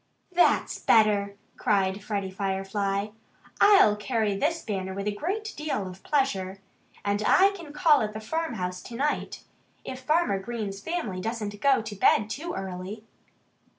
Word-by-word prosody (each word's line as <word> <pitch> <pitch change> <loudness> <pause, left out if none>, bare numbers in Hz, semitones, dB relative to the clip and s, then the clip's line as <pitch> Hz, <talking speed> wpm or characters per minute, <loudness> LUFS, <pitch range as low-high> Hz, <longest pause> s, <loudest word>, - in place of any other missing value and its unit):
"That's 355 0 +2
better!" 205 -2 +3 0.2
cried 195 -1 +1
Freddie 200 -3 -3
Firefly. 195 +1 -2 0.5
"I'll 395 - +7
carry 210 -1 -1
this 320 +9 0
banner 190 -3 -3
with 200 0 -4
a - - +2
great 400 - -3
deal 295 -11 -2
of 185 +1 -10
pleasure. 195 -10 0 0.5
And 205 +1 +1
I 390 - +5
can 340 -7 -9
call 300 -2 +4
at 210 -1 -2
the 215 - -5
farmhouse 220 - -3
to 235 - -9
night 290 +4 -2 0.4
if 260 -1 -6
Farmer 300 - +2
Green's 205 -2 -5
family 215 - -3
doesn't 210 -1 -4
go 275 -5 +4
to 215 -1 -6
bed 210 +2 +3
too 335 +8 -4
early." 190 +3 -6
210 Hz, 150 wpm, -27 LUFS, 195-290 Hz, 0.5 s, I'll